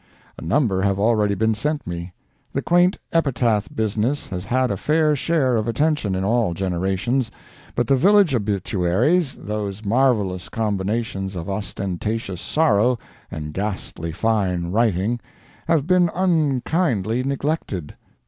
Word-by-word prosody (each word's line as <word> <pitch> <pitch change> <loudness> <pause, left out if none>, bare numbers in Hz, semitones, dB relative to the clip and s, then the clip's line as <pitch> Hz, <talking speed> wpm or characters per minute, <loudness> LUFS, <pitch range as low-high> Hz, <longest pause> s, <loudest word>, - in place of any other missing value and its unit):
A - - -11
number 95 - +1
have 100 0 +1
already 105 -1 +2
been 110 +3 +2
sent 150 +8 -2
me. 85 0 -5 0.4
The - - -1
quaint 175 +2 +3 0.2
epitaph 120 - +1
business 110 +6 -1
has 90 0 -5
had 130 +3 +1
a - - 0
fair 150 - +2
share 135 -4 +1
of 110 0 -1
attention 120 -4 +1
in 95 - -1
all 110 -4 +1
generations, 95 +7 -1 0.5
but - - +1
the 135 - +3
village 195 +2 +5
obituaries—those 105 - 0
marvellous 105 -6 +1
combinations 100 -2 -2
of 85 0 -5
ostentatious 100 0 -3
sorrow 125 -5 +2 0.3
and 75 -1 -6
ghastly 95 -4 -4
"fine 90 -3 0
writing"—have 120 - -1
been 180 0 +4
unkindly 150 - +1
neglected. 135 - -3
110 Hz, 120 wpm, -22 LUFS, 95-135 Hz, 0.5 s, village